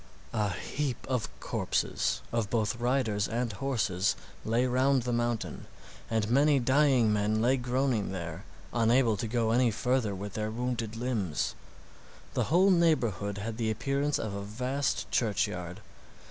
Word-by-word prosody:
A 105 Hz, -3 st, +1 dB
heap 125 Hz, +9 st, -3 dB
of 130 Hz, -4 st, -1 dB
corpses -, -, -1 dB
both 115 Hz, -3 st, -1 dB, 0.2 s
of 120 Hz, -, -11 dB
riders 120 Hz, -5 st, +1 dB
and 120 Hz, -1 st, -2 dB
horses 105 Hz, -5 st, 0 dB, 0.3 s
lay 115 Hz, +3 st, +1 dB
round 130 Hz, +1 st, +2 dB
the 125 Hz, 0 st, -1 dB
mountain, 120 Hz, -1 st, -2 dB, 0.4 s
and 110 Hz, -2 st, 0 dB
many 140 Hz, +5 st, +4 dB
dying 130 Hz, -3 st, +3 dB
men 105 Hz, +1 st, +1 dB
lay 125 Hz, +4 st, +3 dB
groaning 125 Hz, -4 st, 0 dB
there 85 Hz, 0 st, -5 dB, 0.3 s
unable 115 Hz, 0 st, +3 dB
to 110 Hz, +3 st, -3 dB
go 115 Hz, -1 st, +1 dB
any 120 Hz, +1 st, +4 dB
further 115 Hz, -1 st, 0 dB
with 100 Hz, +1 st, -6 dB
their 110 Hz, 0 st, -2 dB
wounded 115 Hz, -1 st, -3 dB
limbs. 100 Hz, -, -1 dB, 0.8 s
The -, -, +1 dB
whole 185 Hz, +5 st, +4 dB
neighborhood 120 Hz, -, +2 dB
had 110 Hz, +2 st, -4 dB
the 115 Hz, -2 st, 0 dB
appearance 140 Hz, +6 st, 0 dB
of 110 Hz, -2 st, -3 dB
a 100 Hz, -, -4 dB
vast 125 Hz, +7 st, -1 dB
churchyard. 90 Hz, -6 st, -1 dB
115 Hz, 145 wpm, -30 LUFS, 105-130 Hz, 0.8 s, many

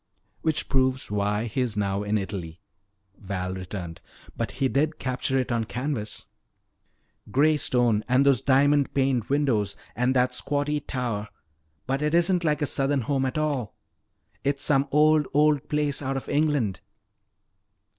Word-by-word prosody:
"Which 160 Hz, -2 st, 0 dB
proves 130 Hz, -3 st, +1 dB
why 105 Hz, +2 st, 0 dB
he 120 Hz, +3 st, -2 dB
is 115 Hz, -4 st, -1 dB
now 100 Hz, -1 st, 0 dB
in 105 Hz, +1 st, 0 dB
Italy," 95 Hz, -4 st, -5 dB, 0.6 s
Val 95 Hz, -2 st, -4 dB
returned. 90 Hz, -2 st, -6 dB, 0.3 s
"But -, -, -3 dB
he 135 Hz, -, +1 dB
did 150 Hz, +4 st, 0 dB
capture 130 Hz, +1 st, -1 dB
it 130 Hz, -1 st, -1 dB
on 115 Hz, -1 st, 0 dB
canvas." 115 Hz, -5 st, -3 dB, 1.0 s
"Gray 150 Hz, +7 st, +4 dB
stone 120 Hz, -6 st, +1 dB
and 130 Hz, +2 st, +4 dB
those 135 Hz, -5 st, +4 dB
diamond 140 Hz, +1 st, +3 dB
paned 130 Hz, -4 st, +1 dB
windows 125 Hz, -9 st, 0 dB, 0.2 s
and 125 Hz, +2 st, +1 dB
that 125 Hz, 0 st, +2 dB
squatty 145 Hz, +2 st, -1 dB
tower. 120 Hz, -7 st, -3 dB, 0.6 s
But 135 Hz, +2 st, -1 dB
it 150 Hz, +2 st, +1 dB
isn't 175 Hz, +1 st, +3 dB
like 150 Hz, -2 st, +1 dB
a -, -, +3 dB
Southern 140 Hz, 0 st, 0 dB
home 135 Hz, +2 st, 0 dB
at 130 Hz, -, -3 dB
all! 145 Hz, -8 st, -1 dB, 0.7 s
It's 140 Hz, 0 st, -1 dB
some 140 Hz, -1 st, +2 dB
old, 150 Hz, 0 st, +4 dB
old 150 Hz, -2 st, +3 dB
place 150 Hz, -1 st, 0 dB
out 135 Hz, -1 st, -2 dB
of 135 Hz, -, -6 dB
England." 145 Hz, -, +1 dB
130 Hz, 150 wpm, -26 LUFS, 110-145 Hz, 1.0 s, Gray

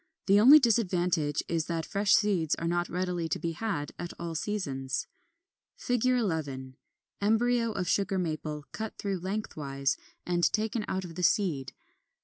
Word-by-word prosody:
The 200 Hz, +1 st, +5 dB
only 265 Hz, +8 st, +10 dB
disadvantage 180 Hz, -, +1 dB
is 165 Hz, -2 st, -1 dB
that 165 Hz, -2 st, -2 dB
fresh 200 Hz, -1 st, +3 dB
seeds 190 Hz, -7 st, +2 dB
are 165 Hz, -, -3 dB
not 175 Hz, 0 st, 0 dB
readily 180 Hz, -2 st, -2 dB
to -, -, 0 dB
be 170 Hz, -, -3 dB
had 165 Hz, -4 st, -3 dB
at 175 Hz, 0 st, -5 dB
all 170 Hz, -1 st, -4 dB
seasons. 145 Hz, -8 st, -2 dB, 0.7 s
[Illustration: 245 Hz, -2 st, -1 dB
Fig. -, -, +1 dB, 0.2 s
11. 140 Hz, -8 st, -3 dB, 0.5 s
Embryo 230 Hz, +2 st, +2 dB
of 180 Hz, -3 st, -2 dB
Sugar 195 Hz, +1 st, +1 dB
Maple, 155 Hz, -3 st, -3 dB
cut 220 Hz, 0 st, -5 dB
through 195 Hz, -2 st, -2 dB
lengthwise 150 Hz, -8 st, -2 dB, 0.3 s
and 175 Hz, -1 st, 0 dB
taken 215 Hz, 0 st, -1 dB
out 190 Hz, 0 st, -2 dB
of 170 Hz, -, -9 dB
the 180 Hz, -, -5 dB
seed. 160 Hz, -8 st, +1 dB
180 Hz, 155 wpm, -29 LUFS, 160-210 Hz, 0.7 s, only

